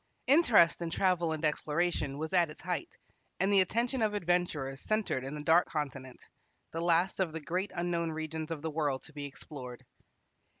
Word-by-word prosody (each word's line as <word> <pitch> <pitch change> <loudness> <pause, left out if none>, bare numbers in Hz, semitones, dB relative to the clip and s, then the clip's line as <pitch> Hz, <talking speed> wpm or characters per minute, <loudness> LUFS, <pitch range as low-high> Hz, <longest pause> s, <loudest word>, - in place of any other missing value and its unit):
Interest 235 - +5
in 170 - -2
travel 175 -1 +1
and 160 0 -2
exploration 150 -1 0
was 160 +3 -4
at 175 -3 +4
its 150 - -11
height, 180 - -4 0.4
and 195 +1 +2
the 195 - +7
attention 235 +6 0
of 215 -1 +1
adventurers 170 -8 -1
centered 215 -12 -1
in 135 +3 -5
the 150 - -6
Dark 165 +3 +5
Continent, 135 -4 -5 0.5
the 165 - -3
last 170 +3 +2
of 180 -5 0
the 160 - -3
great 180 +7 -2
unknown 170 -1 -1
regions 160 0 -4
of 160 -2 -5
the 160 - -2
world 145 -4 -1
to 160 - -14
be 145 -1 -5
explored. 130 -3 -9
165 Hz, 180 wpm, -31 LUFS, 150-180 Hz, 0.5 s, the